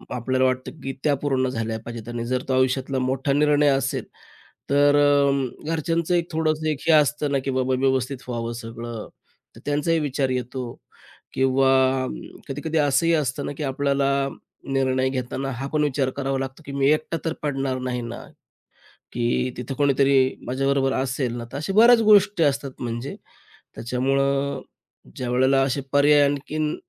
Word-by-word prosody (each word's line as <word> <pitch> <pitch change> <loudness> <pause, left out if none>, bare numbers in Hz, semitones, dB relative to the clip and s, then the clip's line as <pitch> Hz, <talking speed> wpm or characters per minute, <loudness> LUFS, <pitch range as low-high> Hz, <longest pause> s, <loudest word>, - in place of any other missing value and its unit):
आपल्याला 130 +2 +1
वाटतं 130 0 -1
की 135 0 -3
त्या 150 -2 +3
पूर्ण 130 -2 +1
झाल्या 115 -2 -3
पाहिजेत 115 -1 -7
आणि 120 0 -4
जर 125 +1 -1
तो - - +2
आयुष्यातला 130 +1 0
मोठा 130 +2 0
निर्णय 150 0 +3
असेल 135 -1 0 0.7
तर 145 +1 +4
अ, 140 -1 +2
घरच्यांचं 165 +2 0
एक 170 0 -1
थोडंसं 155 0 0
एक 150 -3 -1
हे - - +6
असतं 150 -1 +2
ना 140 - +2
की 135 - -1
बाबा 130 0 0
व्यवस्थित 130 0 0
व्हावं 115 -1 -3
सगळं 115 0 -7 0.5
तर - - -12
त्यांचाही 150 +3 +1
विचार 135 -2 -1
येतो 125 -1 -3 0.6
किंवा 130 0 +2 0.8
कधी-कधी 155 +4 -2
असंही 150 +3 +2
असतं 140 -2 -1
ना - - -3
की - - -4
आपल्याला 140 0 0 0.6
निर्णय 130 -1 +1
घेताना 130 +1 -3
हा 135 +3 -5
पण 150 -1 +2
विचार 135 -2 0
करावा 135 -1 -1
लागतो 135 +4 -6
की 140 - -7
"मी 140 0 +2
एकटा 155 +2 -1
तर 165 - 0
पडणार 135 -3 -1
नाही 125 -1 -3
ना? 115 0 -6 1.0
की 120 +1 0
तिथं 125 +2 -5
कोणीतरी 140 -1 +3 0.3
माझ्याबरोबर 135 +1 +1
असेल 130 -2 -1
ना" 120 - -6
तर 135 - -5
अशा 175 +7 -3
बऱ्याच 230 +2 +7
गोष्टी 205 -4 +5
असतात 140 -1 0
म्हणजे 120 +2 -4 0.6
त्याच्यामुळं 135 +3 0 0.6
ज्यावेळेला 130 +2 +2
असे 140 +1 -1
पर्याय 145 +1 +5
आणखीन 150 +2 -2
135 Hz, 155 wpm, -23 LUFS, 130-145 Hz, 1.0 s, बऱ्याच